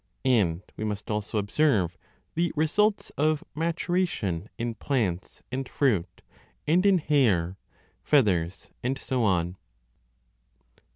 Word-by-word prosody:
And 100 -9 +2
we - - -5
must 105 0 -3
also 105 +1 -2
observe 100 - +2 0.4
the 170 +1 +1
results 200 +8 +1
of 155 0 +2
maturation 165 - -1
in 115 0 -2
plants 110 -9 -2
and 130 0 -3
fruit, 95 - 0 0.4
and 170 +5 +3
in 195 -2 +5
hair, 105 - +2 0.4
feathers, 95 - +1
and 130 +2 -1
so 130 -2 -1
on. 90 -3 +1
120 Hz, 110 wpm, -27 LUFS, 95-150 Hz, 0.4 s, in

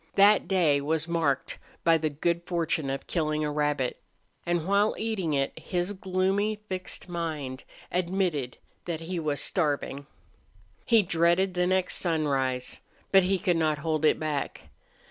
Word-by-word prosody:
That 205 +2 +6
day 165 -7 +3
was 160 +2 -1
marked 160 -5 0 0.2
by 165 -1 +4
the 155 0 0
good 170 +4 -1
fortune 165 -4 0
of 135 0 -3
killing 155 -2 -1
a 150 - -1
rabbit, 145 -3 -1 0.5
and 175 -2 0
while 200 +2 +3
eating 195 -9 -1
it 135 0 0
his 180 +2 -2
gloomy, 190 +2 0
fixed 190 -3 -5
mind 155 -7 -4 0.3
admitted 175 -7 -1 0.3
that 165 -2 -3
he 170 +2 -3
was 150 -3 -1
starving. 145 -4 -1 0.8
He 230 -3 +5
dreaded 175 +2 +2
the 180 0 +1
next 185 0 +2
sunrise. 135 -7 0 0.3
But 195 - +7
he 190 +1 +1
could 180 -3 +1
not 155 -2 +1
hold 160 -1 0
it 155 - +4
back. 155 -3 -3
165 Hz, 145 wpm, -28 LUFS, 150-185 Hz, 0.8 s, But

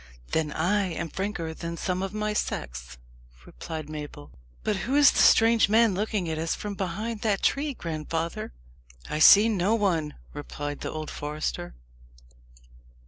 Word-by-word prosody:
"Then 155 -2 0
I 190 +6 +1
am 165 - -4
franker 185 -3 -3
than 170 +1 -6
some 185 +1 -2
of 195 -1 -3
my 210 0 -2
sex," - - -4 0.5
replied 155 - -7
Mabel. 150 -1 -8 0.3
"But 210 - 0
who 260 +8 -2
is 290 0 +7
the - - -1
strange 225 -1 +5
man 225 -1 +4
looking 205 -1 -1
at 160 -1 -2
us 165 0 -1
from 205 -1 -5
behind 210 +4 -4
that 205 -3 0
tree, 285 0 +1
grandfather! 165 - -4 0.6
"I 150 - -1
see 205 +7 +8
no 210 0 +1
one," 170 -9 0 0.2
replied 145 0 -6
the - - -4
old 155 0 -5
forester. 145 - -4
175 Hz, 150 wpm, -26 LUFS, 155-210 Hz, 0.6 s, see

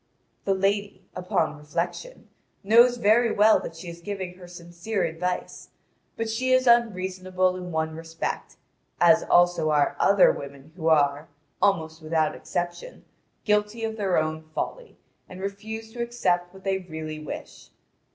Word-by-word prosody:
The 195 - +2
lady, 195 0 -1
upon 180 -4 -1
reflection, 175 - -5 0.4
knows 235 +4 +6
very 230 +1 +4
well 215 +1 +5
that 165 - -8
she 165 +2 -10
is 170 0 -9
giving 190 -1 -5
her 180 -1 -13
sincere 175 +4 -4
advice, 180 +3 -3 0.5
but 225 - -2
she 250 +4 -1
is 255 0 +4
unreasonable 185 -5 +2
in 180 -1 -6
one 160 0 -2
respect, 165 0 -5 0.4
as 170 -2 +6
also 175 -3 +3
are 145 -2 +2
other 200 -1 +6
women 140 +2 -9
who 165 -3 -3
are, 145 -2 +3 0.3
almost 160 -4 +1
without 155 0 0
exception, 175 - -5 0.4
guilty 210 +2 +1
of 220 0 -2
their 195 -4 0
own 155 0 -1
folly, - - -5 0.3
and 185 - -10
refuse 220 +3 -6
to 240 - -5
accept 180 -7 0
what 190 0 -15
they 195 -1 0
really 160 -3 -7
wish. 155 - -9
185 Hz, 145 wpm, -25 LUFS, 165-210 Hz, 0.5 s, knows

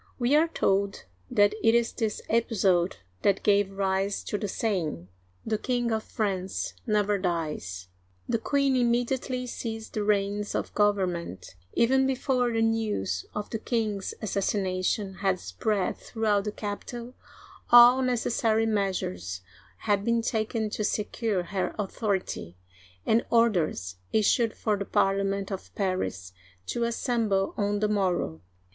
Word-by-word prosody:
We 250 +3 +2
are 315 +2 +5
told 195 - 0 0.2
that 205 0 +4
it 225 +1 +4
is 235 -1 +2
this 220 -3 -2
episode 195 -6 +2 0.2
that 200 -1 +2
gave 205 -1 +3
rise 195 0 0
to 205 - -2
the 210 - -2
saying, 175 - -2 0.2
" 90 0 -36
The 215 -1 -1
King 245 -2 0
of 220 0 0
France 195 -3 -2
never 210 -2 +2
dies." 150 - -3 0.4
The 230 - 0
queen 275 +2 +1
immediately 250 +1 0
seized 225 -2 -5
the 215 - -1
reins 205 0 0
of - - -3
governments 185 - 0 0.2
Even 265 +3 +3
before 255 -2 +1
the 225 0 +1
news 210 - -1
of 210 - -4
the 225 - -2
king's 215 -4 -2
assassination 195 -1 -1
had 190 -2 +1
spread 185 - -1
throughout 215 -3 0
the 210 - -1
capital, 235 +4 -6 0.6
all 245 +2 +9
necessary 230 -3 +1
measures 140 - -2 0.4
had 205 -2 +1
been 235 +1 +1
taken 220 -1 -1
to 210 - -2
secure 210 -2 -1
her 185 +2 -2
authority, 195 - -2 0.5
and 230 +2 +3
orders 170 - +1
issued 220 +1 +2
for 210 -2 0
the 200 - -3
Parliament 195 +1 +1
of 190 - -7
Paris 95 - -2 0.3
to 235 - -1
assemble 230 -5 0
on 205 0 0
the 210 - +3
morrow. 180 - 0
205 Hz, 135 wpm, -27 LUFS, 190-230 Hz, 0.6 s, all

